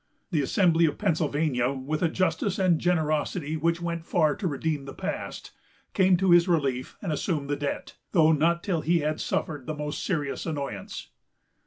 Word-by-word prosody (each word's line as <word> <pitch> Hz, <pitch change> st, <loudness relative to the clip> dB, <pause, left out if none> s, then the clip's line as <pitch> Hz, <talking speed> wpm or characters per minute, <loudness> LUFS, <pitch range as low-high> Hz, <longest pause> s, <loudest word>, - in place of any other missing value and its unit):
The 155 Hz, -5 st, +2 dB
Assembly 165 Hz, +2 st, +3 dB
of 150 Hz, -, -2 dB
Pennsylvania, 150 Hz, -, +1 dB
with 140 Hz, +3 st, -3 dB
a 170 Hz, -, +3 dB
justice 185 Hz, +2 st, 0 dB
and 185 Hz, -2 st, +3 dB
a -, -, -3 dB
generosity 155 Hz, -2 st, 0 dB
which 170 Hz, +2 st, 0 dB
went 170 Hz, -1 st, -3 dB
far 155 Hz, -3 st, +2 dB
to 190 Hz, -, -2 dB
redeem 150 Hz, -1 st, -2 dB
the 135 Hz, -, -8 dB
past, -, -, -5 dB, 0.4 s
came 185 Hz, -1 st, +4 dB
to 190 Hz, 0 st, +2 dB
his 175 Hz, +1 st, +6 dB
relief 140 Hz, -7 st, 0 dB
and 180 Hz, -, -2 dB
assumed 150 Hz, -2 st, -2 dB
the -, -, +2 dB
debt, 145 Hz, 0 st, -4 dB
though 160 Hz, -3 st, +5 dB
not 170 Hz, +3 st, +2 dB
till 175 Hz, -6 st, 0 dB
he 170 Hz, +1 st, +2 dB
had 155 Hz, +1 st, -1 dB
suffered 145 Hz, -5 st, -2 dB
the 155 Hz, -, -3 dB
most 150 Hz, +1 st, -4 dB
serious 150 Hz, -6 st, -2 dB
annoyance. 140 Hz, -, -5 dB
160 Hz, 180 wpm, -27 LUFS, 145-170 Hz, 0.4 s, his